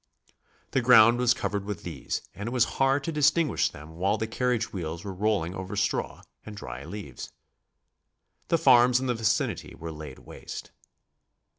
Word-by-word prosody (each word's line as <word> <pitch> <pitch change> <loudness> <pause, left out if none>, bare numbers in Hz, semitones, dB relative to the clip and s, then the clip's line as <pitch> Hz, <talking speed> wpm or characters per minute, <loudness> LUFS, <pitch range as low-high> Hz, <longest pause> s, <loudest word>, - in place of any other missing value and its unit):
The 135 - +2
ground 120 -1 +7
was 125 -1 +3
covered 100 -4 -2
with 105 -1 -5
these 80 -6 -4
and 105 +4 -6
it - - -3
was 125 -2 +3 0.2
hard 135 +1 +3
to 165 - -2
distinguish 150 +1 +2
them 80 +3 -12
while 95 +3 +1
the 110 - -2
carriage 115 0 -1
wheels 85 -3 -5
were 100 - -5
rolling 95 -3 0
over 95 +1 -6
straw 100 0 -1 0.2
and 105 -1 -9
dry 65 -7 -7
leaves. 85 -7 -8 1.2
The 165 - +3
farms 125 -3 +5
in 130 - -3
the 125 - +1
vicinity 115 -1 -1
were 80 0 -7
laid 75 -4 -9
waste. - - -9
105 Hz, 165 wpm, -27 LUFS, 90-125 Hz, 1.2 s, ground